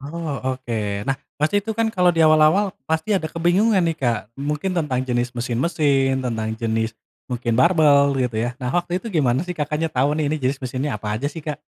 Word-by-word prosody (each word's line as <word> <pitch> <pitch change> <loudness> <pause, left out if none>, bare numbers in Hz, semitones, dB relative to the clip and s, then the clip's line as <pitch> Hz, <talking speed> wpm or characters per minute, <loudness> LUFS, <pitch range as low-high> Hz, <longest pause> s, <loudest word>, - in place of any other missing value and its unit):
Oh, 140 -3 -4
oke. 120 -3 -4 0.3
Nah, 135 - +1 0.2
pasti 155 +7 +2
itu 220 - -2
kan 225 +1 0
kalau 180 -4 +3
di 165 - 0
awal-awal 155 +5 +5 0.2
pasti 160 +6 0
ada 160 -3 -4
kebingungan 185 +5 +3
nih, 165 -2 0
Kak, 120 -6 0 0.2
mungkin 150 +6 -2
tentang 145 -7 0
jenis 125 -1 -1
mesin-mesin, 135 +2 +1
tentang 110 -3 -2
jenis 110 0 -1 0.3
mungkin 120 -3 -2
barbel 145 -3 +5
gitu 125 -3 -1
ya. 120 - -2
Nah, 125 - -2
waktu 175 +1 -1
itu 230 - -7
gimana 140 - +1
sih 180 +1 -5
Kakaknya 150 +2 -1
tau 140 0 +1
nih, 155 -1 0
ini 155 - 0
jenis 135 0 -2
mesinnya 130 -2 -3
apa 105 0 -2
aja 140 - -2
sih, 165 - -7
Kak? 150 -1 -4
145 Hz, 200 wpm, -22 LUFS, 125-165 Hz, 0.3 s, awal-awal